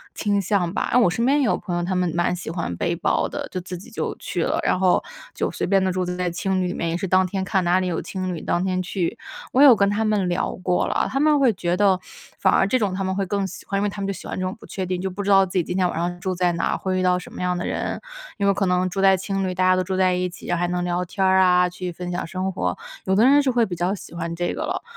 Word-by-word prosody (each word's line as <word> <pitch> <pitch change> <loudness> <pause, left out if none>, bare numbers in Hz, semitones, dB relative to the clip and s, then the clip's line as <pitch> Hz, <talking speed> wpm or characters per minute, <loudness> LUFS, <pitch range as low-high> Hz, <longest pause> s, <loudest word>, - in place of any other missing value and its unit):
倾 205 -1 +1
向 185 -2 0
吧。 - - -2
嗯， 250 - +6
我 220 - +4
身 230 +7 -1
边 280 +3 +3
也 - - +2
有 - - +2
朋 175 - -4
友， 175 - -1
他 185 +2 -1
们 180 -2 +1
蛮 175 +1 +1
喜 175 - -7
欢 165 - -3
背 - - 0
包 - - +1
的， - - -5
就 185 - -3
自 180 0 -7
己 180 - -12
就 - - -3
去 - - -2
了， - - 0
然 - - +1
后 185 -1 +3 0.3
就 - - -1
随 - - -3
便 195 0 +3
地 190 - +1
住 185 0 -1
在 180 0 -2
青 185 +2 -1
旅 180 - 0
里 180 - -3
面， 170 - -2
也 165 - -1
是 190 - -3
当 185 +1 +4
天 190 +1 -2
看 190 0 0
哪 175 +2 +3
里 185 - -1
有 170 - -2
青 185 -1 -4
旅 - - -7
当 175 - 0
天 185 -1 0
去。 180 +3 -2 0.4
我 260 - +4
有 270 -5 +9
跟 200 -1 +2
他 210 +2 0
们 205 -4 +1
聊 175 - -1
过 180 -1 +1
了， - - 0
他 270 - 0
们 300 0 +4
会 265 -4 +4
觉 175 -2 -1
得 195 -2 +3 0.4
反 190 - +3
而 - - +4
这 255 +5 +2
种 205 -4 0
他 195 +1 -2
们 190 0 -1
会 195 0 -1
更 200 +1 -1
喜 185 - -10
欢， 200 - -2
因 - - 0
为 205 - +1
他 200 0 -7
们 195 - -2
就 195 - -1
喜 185 - -9
欢 - - -5
这 185 - -2
种 185 - -2
不 - - -13
确 190 -1 -4
定， 180 0 -2
就 190 - -2
不 200 +2 -5
知 200 - -2
道 195 -1 +6
自 180 - -10
己 180 - +3
今 180 +3 -3
天 185 -1 +3
晚 - - -5
上 175 +1 -2
住 185 +1 -2
在 180 0 +2
哪 170 - -1
儿， - - -1
会 185 -1 -2
遇 - - 0
到 180 0 +3
什 180 - -11
么 - - -7
样 180 0 0
的 175 - -3
人。 - - -3 0.4
因 200 - 0
为 200 - +4
可 195 - 0
能 180 0 +1
住 195 +2 -2
在 195 0 +6
青 195 0 -2
旅， 185 - -2
大 185 - +1
家 185 0 +5
都 185 - +1
住 190 +1 -3
在 185 -1 +3
一 180 0 -1
起， 175 - -8
还 175 0 +1
能 180 0 -1
聊 180 0 -1
天 190 +2 -1
儿 190 0 +4
啊， 180 -1 +4
去 180 0 -5
分 180 +1 -6
享 175 - -3
生 185 +2 -2
活， 185 - -2 0.3
有 190 - +2
的 215 - +4
人 285 +2 +6
是 270 - +1
会 240 -2 +3
比 180 - -5
较 175 +3 0
喜 195 - -12
欢 170 -1 -4
这 175 +1 -2
个 - - -5
了。 - - -3
185 Hz, 350 characters per minute, -23 LUFS, 180-195 Hz, 0.4 s, 有